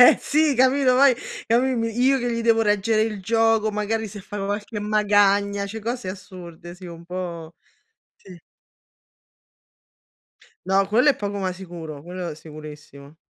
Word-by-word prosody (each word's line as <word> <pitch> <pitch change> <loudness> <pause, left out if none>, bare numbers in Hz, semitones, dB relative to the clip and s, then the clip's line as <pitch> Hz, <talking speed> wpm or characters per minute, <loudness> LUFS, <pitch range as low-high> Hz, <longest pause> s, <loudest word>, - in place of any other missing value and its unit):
Eh 245 - +9
sì, 300 -1 +2
capito, 260 +1 +3
poi 265 -1 +6 0.3
a 230 - +4
me 260 +1 +1
mi 230 -1 -1
io 270 +2 +4
che 245 -1 -2
gli 230 - -2
devo 225 -1 +3
reggere 210 +1 +2
il 215 -3 -3
gioco, 225 0 +2
magari 210 +1 -2
se 205 0 -9
fa 205 +2 -9
qualche 205 +2 -4
magagna, 205 -1 +2
cioè 220 +2 -7
cose 235 -2 -4
assurde, 180 -3 -10
sì 185 0 -12
un 170 -1 -10
po' 170 -2 -6 0.6
sì. 185 -3 -14 2.3
No, 195 +1 +2
quello 245 +8 +4
è 275 - +4
poco 205 0 -4
ma 190 -1 -2
sicuro, 170 -5 -9
quello 175 -1 -6
sicurissimo. 150 -1 -12
205 Hz, 155 wpm, -23 LUFS, 180-230 Hz, 2.3 s, Eh